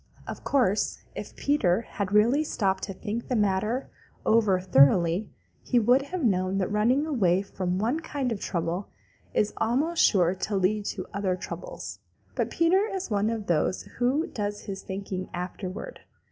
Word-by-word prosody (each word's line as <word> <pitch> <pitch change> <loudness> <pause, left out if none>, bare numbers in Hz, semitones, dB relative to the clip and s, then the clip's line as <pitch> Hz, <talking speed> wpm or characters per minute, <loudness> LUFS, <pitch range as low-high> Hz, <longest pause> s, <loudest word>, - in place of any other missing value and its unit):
Of - - -7
course 240 -7 +1
if - - -7
Peter 225 -10 +2
had 200 -4 -4
really 235 +8 +4
stopped 195 -9 0
to 195 - -6
think 225 +4 -4
the 250 - 0
matter 210 +4 0 0.3
over 215 -4 +4
thoroughly 170 +3 +4 0.3
he 250 - 0
would 245 +4 +5
have 340 +4 -4
known 185 -3 +1
that 195 +1 -1
running 240 +8 +2
away 195 - +2
from 185 -2 -2
one 235 +10 0
kind 280 -6 -3
of 215 - -2
trouble 175 +1 -2 0.5
is 210 - +2
almost 295 +9 +1
sure 180 -4 +4
to 200 +2 -3
lead 200 +2 +1
to 185 -3 -4
other 195 -2 0
troubles. - - -7 0.3
But - - -1
Peter 370 +5 +3
is 380 - -4
one 205 +1 +2
of 225 -2 -3
those 170 +1 +1 0.2
who 265 +6 +2
does 205 -6 -4
his 195 -1 -6
thinking 190 -1 -5
afterward. 185 - -6
210 Hz, 160 wpm, -27 LUFS, 185-250 Hz, 0.5 s, would